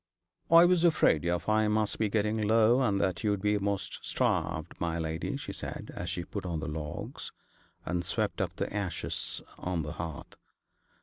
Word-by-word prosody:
'I 170 +1 +9
was 175 -1 +4
afraid 155 - +4
your 85 +1 +2
fire 110 +3 +2
must 105 -1 +1
be 110 -2 +2
getting 110 +1 +1
low, 115 +4 +4
and 105 -6 +2
that 95 -3 0
you'd 105 -2 +1
be 105 +2 +2
amost 100 -1 -2
starved, 80 +2 0
my 85 -1 0
lady,' 80 -1 -2
she - - -6
said, - - -5
as 90 - -4
she 90 -1 -3
put 100 - -5
on 85 -3 -2
the - - -4
logs, 75 0 -5 0.5
and 90 -1 -1
swept - - -1
up - - -2
the - - -3
ashes 100 -4 -3 0.2
on 90 -3 -2
the 75 - -5
hearth. 80 -1 -7
100 Hz, 180 wpm, -30 LUFS, 85-110 Hz, 0.5 s, I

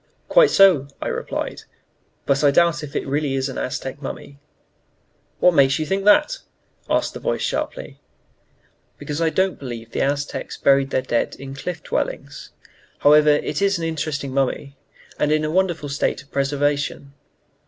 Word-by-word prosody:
"Quite - - +6
so," 180 -9 +5
I - - -3
replied. - - -4 0.6
"But 140 +1 +1
I 145 - +6
doubt 165 +1 +3
if 150 -1 -9
it - - +1
is - - -11
really 140 0 -1
an 135 0 -2
Aztec 130 +2 -4
mummy." 140 0 -8 1.0
"What 180 - +5
makes 135 -3 +4
you 155 - -2
think 195 +4 -2
that?" 300 - +4 0.5
asked - - 0
the - - -7
voice - - -2
sharply. - - -4 1.0
"Because 150 +1 -5
I 165 - +3
don't 190 +3 0
believe 115 -4 -7
the - - -2
Aztecs 145 +1 -2
buried 135 -1 +3
their 130 - 0
dead 120 -2 -1
in 135 0 -9
Cliff 160 +4 -6
Dwellings. - - -4 0.5
However, 150 +1 +5
it 150 +6 +1
is 200 -1 +2
an 170 - -5
interesting 155 -4 -3
mummy, 140 +1 -1 0.4
and 150 - +1
in 155 0 +2
a 155 - -2
wonderful 175 -4 0
state 140 -1 -2
of 140 - -29
preservation." 140 0 -1
145 Hz, 165 wpm, -21 LUFS, 140-165 Hz, 1.0 s, Quite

